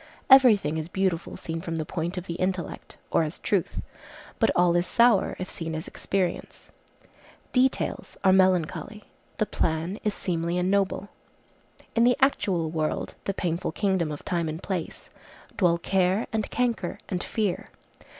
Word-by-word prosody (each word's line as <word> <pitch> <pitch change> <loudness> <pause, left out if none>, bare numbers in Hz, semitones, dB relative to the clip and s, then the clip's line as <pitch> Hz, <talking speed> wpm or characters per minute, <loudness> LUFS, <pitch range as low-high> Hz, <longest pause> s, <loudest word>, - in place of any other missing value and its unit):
Every 260 -5 +9
thing 155 -4 -3
is 155 - -4
beautiful 185 -2 -1
seen 165 0 -5
from 165 -1 -4
the 160 -1 -2
point 170 +3 -3
of 180 - -4
the 170 - -4
intellect, 185 -1 -3
or - - +4
as 155 +1 -2
truth. 195 -5 -1 0.6
But - - +4
all 175 -1 +4
is 175 +1 +2
sour, 235 -4 +4
if 185 - -4
seen 165 -2 -5
as 160 +3 -5
experience. 185 -3 -3 0.8
Details 255 +1 0
are 190 -1 +6
melancholy; 185 +3 +1 0.3
the 215 - +2
plan 165 +2 -1
is 210 -2 0
seemly 170 -1 -1
and 180 +1 +1
noble. 200 0 0 0.9
In 230 - +4
the 245 +1 +4
actual 185 - +1
world—the 160 +4 -3
painful 170 -2 -2
kingdom 190 -6 0
of 145 - -7
time 170 -2 -1
and 160 +3 -6
place—dwell 180 0 -3
care, 190 +4 +1
and 220 -2 -1
canker, 235 -7 -1
and 180 -2 -2
fear. 210 -5 -2
180 Hz, 150 wpm, -26 LUFS, 165-200 Hz, 0.9 s, Every